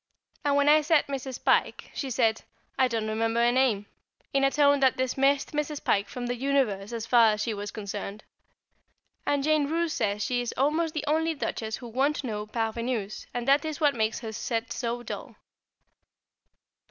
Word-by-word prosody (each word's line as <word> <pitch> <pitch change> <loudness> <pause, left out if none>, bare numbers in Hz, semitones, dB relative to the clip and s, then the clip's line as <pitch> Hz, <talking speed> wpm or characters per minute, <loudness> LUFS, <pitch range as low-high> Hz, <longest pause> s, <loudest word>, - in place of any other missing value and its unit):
And 285 -1 +2
when 285 0 +3
I 305 +1 +7
said 305 0 +3
Mrs. 265 -2 -5
Pike, - - +1
she 275 - -4
said, 225 -2 +1 0.3
"I 260 - +3
don't 225 -3 -2
remember 225 +2 +1
the 240 - +4
name," 245 -6 +2 0.5
in 275 0 +2
a 275 - +5
tone 285 0 +4
that 265 -2 +3
dismissed 270 +2 +1
Mrs. 300 -1 -3
Pike 200 0 +1
from 245 +2 -5
the 245 - -1
universe 245 -7 0
as 230 -1 -4
far 230 -2 +5
as 210 - -3
she 230 - -1
was 205 0 -5
concerned; 205 0 -6 1.0
and 285 -1 +1
Jane 305 -1 +2
Roose 330 +1 0
says 210 -1 -1
she 245 +2 0
is 240 - -4
almost 310 +4 +1
the 300 - -2
only 320 +2 +1
Duchess 220 -6 -3
who 240 - -9
won't 275 +6 0
know 210 -4 -4
parvenues, 225 -1 -3
and 245 0 -4
that 280 +1 +5
is 310 -1 -4
what 295 -3 +3
makes 220 -2 -1
her 225 -2 -5
set 230 +2 -3
so 240 0 -3
dull. - - -7
250 Hz, 185 wpm, -27 LUFS, 225-285 Hz, 1.0 s, I